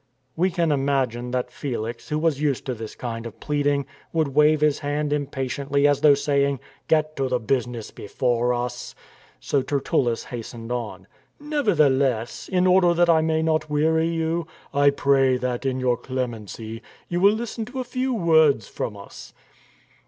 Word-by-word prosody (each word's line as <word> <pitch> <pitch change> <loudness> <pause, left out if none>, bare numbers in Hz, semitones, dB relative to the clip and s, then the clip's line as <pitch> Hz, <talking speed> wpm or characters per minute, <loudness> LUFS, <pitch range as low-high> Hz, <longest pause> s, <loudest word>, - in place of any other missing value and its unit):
We 180 +3 +2
can 170 -3 0
imagine 135 -4 0
that 125 0 -2
Felix, 120 -4 -5
who 150 - 0
was 155 -3 0
used 145 -4 0
to 130 - -2
this 110 -2 -8
kind 115 -1 -5
of 115 - -12
pleading, 145 -1 0 0.3
would 160 -3 +1
wave 150 +2 +4
his 150 -1 +2
hand 145 0 -1
impatiently 140 0 0
as 145 -1 +2
though 150 -2 +7
saying, 140 -1 +1
" - - -33
Get 155 -1 +2
to 135 -1 0
the 125 - +1
business 120 -1 -2
before 120 +3 -1
us." 120 0 -4 0.4
So 140 - 0
Tertullus 135 -3 0
hastened 115 -1 -7
on. 120 -3 -4 0.2
" - - -43
Nevertheless, 150 - +1
in 180 -1 +2
order 180 -1 +4
that 175 0 +4
I 160 -1 +4
may 160 0 +1
not 155 -1 0
weary 160 +2 +2
you, 165 0 -1 0.3
I 145 0 +5
pray 135 -2 +3
that, 125 +1 -2
in 130 -1 -1
your 125 -1 +1
clemency, 115 -3 -5 0.3
you 175 - -1
will 200 +2 +6
listen 225 0 -4
to 255 +3 -7
a - - -1
few 255 +1 -2
words 160 - +3
from 105 - -5
us." 100 - -12
140 Hz, 170 wpm, -24 LUFS, 125-160 Hz, 0.4 s, though